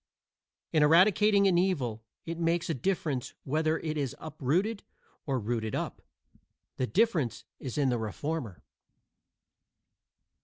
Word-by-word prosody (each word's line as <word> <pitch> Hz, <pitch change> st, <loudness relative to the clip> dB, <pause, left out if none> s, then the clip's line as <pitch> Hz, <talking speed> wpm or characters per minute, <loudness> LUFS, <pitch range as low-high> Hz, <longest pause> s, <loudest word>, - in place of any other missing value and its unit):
In 155 Hz, -, +4 dB
eradicating 200 Hz, +6 st, +5 dB
an 175 Hz, -2 st, +4 dB
evil, 135 Hz, -, 0 dB, 0.2 s
it 165 Hz, 0 st, -5 dB
makes 170 Hz, 0 st, +1 dB
a -, -, +1 dB
difference 145 Hz, -3 st, -2 dB
whether 155 Hz, +3 st, +1 dB
it 155 Hz, -1 st, -3 dB
is 140 Hz, -4 st, -2 dB
uprooted 165 Hz, -, -1 dB, 0.5 s
or 135 Hz, -2 st, +1 dB
rooted 110 Hz, 0 st, -2 dB
up. -, -, -4 dB, 0.8 s
The 130 Hz, -, 0 dB
difference 180 Hz, -, +1 dB, 0.2 s
is 130 Hz, -1 st, -5 dB
in 140 Hz, -3 st, +3 dB
the 120 Hz, -2 st, 0 dB
reformer. 110 Hz, -, -4 dB
155 Hz, 120 wpm, -30 LUFS, 130-175 Hz, 0.8 s, eradicating